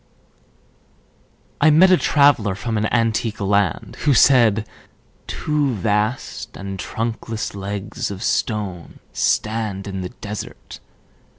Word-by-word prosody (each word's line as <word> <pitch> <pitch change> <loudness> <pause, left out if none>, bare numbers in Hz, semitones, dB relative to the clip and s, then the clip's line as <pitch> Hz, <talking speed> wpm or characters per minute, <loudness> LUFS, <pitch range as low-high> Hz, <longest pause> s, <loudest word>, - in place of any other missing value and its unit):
I 155 - +6
met 175 +5 +6
a - - +8
traveller 140 - +3
from 115 +3 -3
an 105 0 0
antique 115 -1 0
land 100 -3 0
Who 145 -3 +4
said: 115 -6 +5 0.6
"Two 145 -4 -1
vast 105 +3 -2
and 95 +1 -6
trunkless 115 +1 -4
legs 100 +4 -4
of 100 -1 -6
stone 100 -7 -2 0.2
Stand 105 -3 -1
in 95 -1 -4
the 90 - -5
desert. 105 0 -8
110 Hz, 110 wpm, -21 LUFS, 100-120 Hz, 0.6 s, a